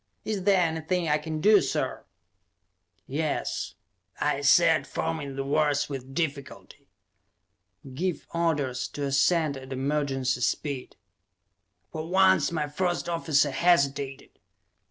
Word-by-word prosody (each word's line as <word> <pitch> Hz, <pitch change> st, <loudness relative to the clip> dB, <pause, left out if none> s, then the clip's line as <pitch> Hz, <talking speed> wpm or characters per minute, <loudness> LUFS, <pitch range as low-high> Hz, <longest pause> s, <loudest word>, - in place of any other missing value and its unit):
"Is 205 Hz, -4 st, -3 dB
there 195 Hz, -2 st, +4 dB
anything 165 Hz, +1 st, -1 dB
I 150 Hz, 0 st, +2 dB
can 155 Hz, 0 st, -5 dB
do, 210 Hz, +2 st, +6 dB
sir?" -, -, -2 dB, 1.0 s
"Yes," 150 Hz, +2 st, -3 dB, 0.4 s
I -, -, 0 dB
said, -, -, +4 dB
forming 155 Hz, -4 st, -3 dB
the 135 Hz, -, -2 dB
words 145 Hz, +1 st, +1 dB
with 135 Hz, -1 st, -7 dB
difficulty. 145 Hz, -4 st, -5 dB, 1.1 s
"Give 175 Hz, +3 st, -2 dB
orders 145 Hz, -7 st, 0 dB
to 145 Hz, -, -2 dB
ascend 140 Hz, +2 st, +2 dB
at 130 Hz, 0 st, -11 dB
emergency 135 Hz, -2 st, -1 dB
speed!" 135 Hz, +2 st, -2 dB, 1.0 s
For 155 Hz, 0 st, -5 dB
once 190 Hz, 0 st, +4 dB
my 155 Hz, -3 st, -1 dB
first 175 Hz, +3 st, -2 dB
officer 155 Hz, -4 st, +1 dB
hesitated. 140 Hz, -4 st, 0 dB
150 Hz, 115 wpm, -27 LUFS, 140-170 Hz, 1.1 s, do